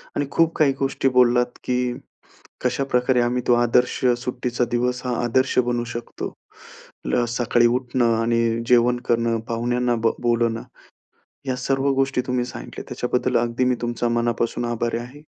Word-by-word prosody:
आणि 145 - 0
खूप 165 0 +2
काही 140 -3 +4
गोष्टी 135 0 0
बोललात, 125 0 +5 0.2
की 125 -1 0 0.7
कशाप्रकारे 125 -1 +1
आम्ही 125 +1 0
तो 120 - +6
आदर्श 120 +1 +2 0.2
सुट्टीचा 125 0 -2
दिवस 125 +1 0
हा 125 - 0
आदर्श 130 +3 +1
बनू 120 -1 0
शकतो. 120 0 -6 1.0
सकाळी 120 0 +2
उठणं 120 -1 +1
आणि 115 0 +1 0.3
जेवण 125 0 +4
करणं, 115 -1 +1
पाहुण्यांना 120 +1 0
बोलवणं, 115 0 0 0.8
या 130 -1 -1
सर्व 135 +2 0
गोष्टी 135 -1 +1
तुम्ही 125 -1 0
सांगितल्या, - - -8
त्याच्याबद्दल 125 +1 0
अगदी 120 +1 0
मी 125 0 +2
तुमचा 120 0 -1
मनापासून 120 0 -1
आभारी 120 0 -1
आहे, 125 +5 -9
120 Hz, 135 wpm, -22 LUFS, 120-125 Hz, 1.0 s, तो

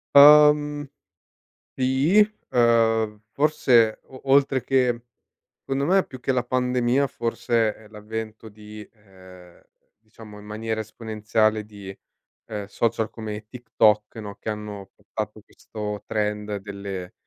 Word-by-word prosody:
Uhm, 150 0 +7 0.9
sì. 135 +10 +2 0.3
Ehm, 115 -3 +2
forse 125 -7 +3
o 130 -1 -14
oltre 135 -2 +3
che 125 -2 +1 0.6
secondo 135 +1 -2
me, 190 +2 +3
più 130 -1 -11
che 135 - -2
la 125 -2 +1
pandemia, 125 +1 +1
forse 115 -3 -1
è 110 - -17
l'avvento 110 +1 -7
di 105 0 -11
ehm, 95 -4 -17 0.4
diciamo 110 -1 -14
in 105 - -13
maniera 110 +1 -4
esponenziale, 110 0 -1
di, 100 -2 -10 0.5
ehm, 105 -2 -5
social 110 +2 -1
come 105 -1 -7
TikTok, 110 -3 +1
no, 105 -2 -7
che - - -9
hanno 105 -2 -6
portato 105 +1 -7
questo 105 -1 -7
trend 105 -1 -2
delle 100 -2 -7
110 Hz, 120 wpm, -24 LUFS, 105-125 Hz, 0.9 s, Uhm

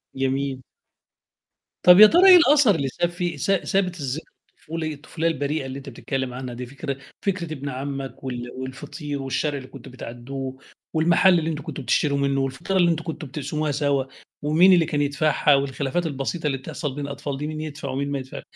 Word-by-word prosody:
جميل. 135 0 -1 1.2
طَب 180 +2 +8
يا 215 - +12
ترى 365 - +6
إيه 365 - +11
الأثر 290 - +5
اللي 140 -4 -1
ساب 175 +6 -1
فيه 175 -3 -3
س - - -3
سابت 185 -2 0
الذ 135 +1 -2 0.4
الطفولي 160 -1 -4
الطفولية 160 +3 -3
البريئة 150 -2 -1
اللي 130 0 -6
أنت 140 0 -8
بتتكلّم 130 +1 -4
عنها 125 -1 -6
دي 125 +1 -6
فكر 140 +2 -5 0.2
فكرة 180 -5 -2
ابن 140 -1 -5
عمّك 135 0 -5
وال 120 -2 -5
والفطير 140 +3 -6
والشارع 140 +2 -1
اللي 130 -1 -8
كنتم 135 -2 -12
بتعدّوه 130 +2 -7 0.4
والمحل 175 +3 +4
اللي 160 0 -2
أنتم 150 -2 -4
كنتم 140 - -6
بتشتروا 140 +2 +1
منّه 140 -1 +1
والفطيرة 135 +8 -2
اللي 175 -2 +4
أنتم 165 0 -2
كنتم 160 -2 -6
بتقسموها 150 +2 -3
سوى 140 -2 0 0.3
ومين 165 +6 +5
اللي 170 -3 +4
كان 150 -2 -1
يدفعها 145 0 +3
والخلافات 140 +4 -1
البسيطة 150 +2 -2
اللي 135 -2 0
بتحصل 135 +1 -5
بين 145 - -4
الأطفال 140 0 -5
دي 150 - -4
مين 155 0 -5
يدفع 150 -2 -6
ومين 140 +2 -2
ما 140 - -1
يدفع 130 0 -8
145 Hz, 190 wpm, -24 LUFS, 135-160 Hz, 1.2 s, يا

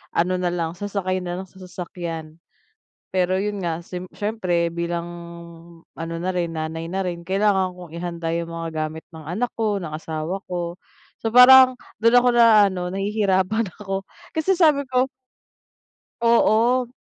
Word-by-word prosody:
ano 180 +2 +1
na 180 - 0
lang, 165 -2 -2
sasakay 190 -1 -2
na 180 +1 -4
lang - - -15
sa 190 +1 -19
sasakyan. 170 -3 -7 0.8
Pero 185 0 +2
yun 205 0 -2
nga, 170 -1 -2
sim 180 0 -7
siyempre 185 -6 -1
bilang 170 0 -2 0.9
ano 165 0 -5
na 185 - -1
rin, 170 -2 -1
nanay 160 +1 -4
na 190 +2 -2
rin, 170 -1 -4
kailangan 190 +1 +1
kong 180 -2 -11
ihanda 170 -1 -3
yung 170 0 -3
mga 165 0 -4 0.2
gamit 160 +1 -10
ng 160 -1 -10
anak 210 +10 -2
ko, 210 -3 +1
ng 165 - -5
asawa 160 +3 -4
ko. 175 -1 -3 0.4
So 225 - -3
parang, 255 +1 +9 0.2
dun 230 +1 +4
ako 245 0 +6
na-aano, 200 -6 +5
nahihirapan 200 +1 +1
ako, 195 -1 -3 0.3
kasi 320 +5 +2
sabi 305 -6 +4
ko 255 +1 +2 1.1
Oo. 235 +2 +3
185 Hz, 150 wpm, -23 LUFS, 170-215 Hz, 1.1 s, parang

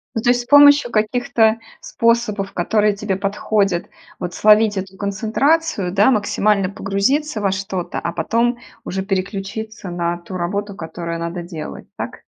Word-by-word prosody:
Ну, 225 - 0
то 240 - +1
есть 245 0 +3
с - - -11
помощью 285 -2 +6
каких-то 225 0 +2 0.2
способов, 230 - 0
которые 210 +4 +2
тебе 200 -1 -2
подходят, 200 -2 0 0.3
вот 180 0 -4
словить 215 0 +4
эту 190 0 -5
концентрацию, 215 - 0
да, 205 +7 +4
максимально 205 -3 +1
погрузиться 205 +8 -1
во 195 -1 +1
что-то, 190 -2 -3
а 170 - -3
потом 235 +8 0 0.3
уже 190 +1 -3
переключиться 195 +2 -4
на 175 0 -2
ту 175 +2 -10
работу, 200 +3 -3
которую 170 0 -5
надо 170 +1 -4
делать, 165 -3 -8
так? - - -6
205 Hz, 145 wpm, -19 LUFS, 190-225 Hz, 0.3 s, помощью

